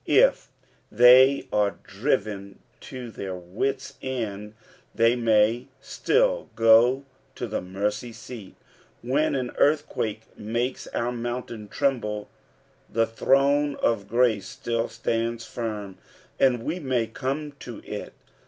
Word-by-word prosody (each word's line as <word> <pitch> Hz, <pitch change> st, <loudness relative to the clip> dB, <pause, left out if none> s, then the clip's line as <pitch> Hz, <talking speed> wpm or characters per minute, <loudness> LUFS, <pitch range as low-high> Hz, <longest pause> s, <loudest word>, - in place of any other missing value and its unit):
If -, -, +4 dB, 0.4 s
they 125 Hz, +4 st, +7 dB
are 105 Hz, -1 st, +1 dB
driven 100 Hz, -1 st, -2 dB, 0.3 s
to 125 Hz, -3 st, -7 dB
their 95 Hz, -3 st, -5 dB
wits' 105 Hz, +10 st, -3 dB
end, 110 Hz, -5 st, -4 dB, 0.4 s
they 115 Hz, +1 st, +4 dB
may 115 Hz, +1 st, +2 dB
still -, -, +1 dB
go 115 Hz, +4 st, +5 dB, 0.3 s
to -, -, -4 dB
tho -, -, -3 dB
mercy 105 Hz, +5 st, -3 dB
seat. 110 Hz, -2 st, -10 dB, 0.5 s
When 140 Hz, +6 st, +1 dB
an 125 Hz, -2 st, -2 dB
eurthquake 130 Hz, -7 st, +1 dB
makes 120 Hz, +4 st, -3 dB
our 120 Hz, +1 st, -2 dB
mountain 120 Hz, -2 st, -5 dB
tremble, 105 Hz, -4 st, -1 dB, 0.6 s
the 115 Hz, 0 st, +2 dB
throne 140 Hz, +5 st, +2 dB
of 100 Hz, -4 st, 0 dB
grace 115 Hz, -3 st, +2 dB
still 115 Hz, -1 st, -2 dB
stands 115 Hz, 0 st, -2 dB
fimit 105 Hz, -5 st, -5 dB, 0.4 s
and 125 Hz, -3 st, +3 dB
we 165 Hz, +7 st, -2 dB
may 130 Hz, -6 st, 0 dB
come 135 Hz, +6 st, -4 dB
to 120 Hz, -3 st, -9 dB
it. -, -, -6 dB
115 Hz, 115 wpm, -25 LUFS, 105-130 Hz, 0.6 s, they